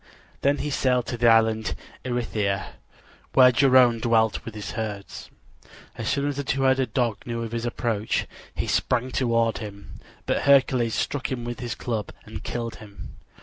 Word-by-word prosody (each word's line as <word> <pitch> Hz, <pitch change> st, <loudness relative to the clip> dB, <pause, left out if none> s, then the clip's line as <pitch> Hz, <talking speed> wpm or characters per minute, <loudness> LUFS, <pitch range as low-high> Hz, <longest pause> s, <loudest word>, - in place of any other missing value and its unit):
Then 140 Hz, +1 st, +2 dB
he 150 Hz, -, -3 dB
sailed 125 Hz, -3 st, +1 dB
to 120 Hz, -, -4 dB
the 120 Hz, -, +4 dB
island 110 Hz, -1 st, +3 dB, 0.3 s
Erythia, 110 Hz, -6 st, -1 dB, 0.6 s
where 125 Hz, -1 st, +7 dB
Geryone 125 Hz, -2 st, +5 dB
dwelt 110 Hz, -2 st, +2 dB
with 115 Hz, -, -8 dB
his 105 Hz, -2 st, -5 dB
herds. 105 Hz, -3 st, -6 dB, 0.7 s
As -, -, -3 dB
soon 140 Hz, 0 st, 0 dB
as 145 Hz, -1 st, -3 dB
the 140 Hz, -, -2 dB
two 135 Hz, 0 st, -1 dB
headed 130 Hz, -1 st, +2 dB
dog 120 Hz, -5 st, +1 dB
knew 115 Hz, -1 st, -3 dB
of 115 Hz, -, -6 dB
his 115 Hz, 0 st, -2 dB
approach 115 Hz, -3 st, -1 dB, 0.3 s
he -, -, -2 dB
sprang 125 Hz, +1 st, 0 dB
toward 115 Hz, -3 st, +1 dB
him; 100 Hz, -2 st, -9 dB, 0.3 s
but -, -, 0 dB
Hercules 130 Hz, -4 st, +4 dB
struck 140 Hz, -2 st, -2 dB
him 125 Hz, -2 st, -3 dB
with 120 Hz, 0 st, -5 dB
his 120 Hz, -2 st, -4 dB
club 110 Hz, -5 st, -3 dB, 0.2 s
and -, -, -8 dB
killed 115 Hz, -1 st, -4 dB
him. 105 Hz, -2 st, -11 dB
120 Hz, 170 wpm, -25 LUFS, 110-130 Hz, 0.7 s, where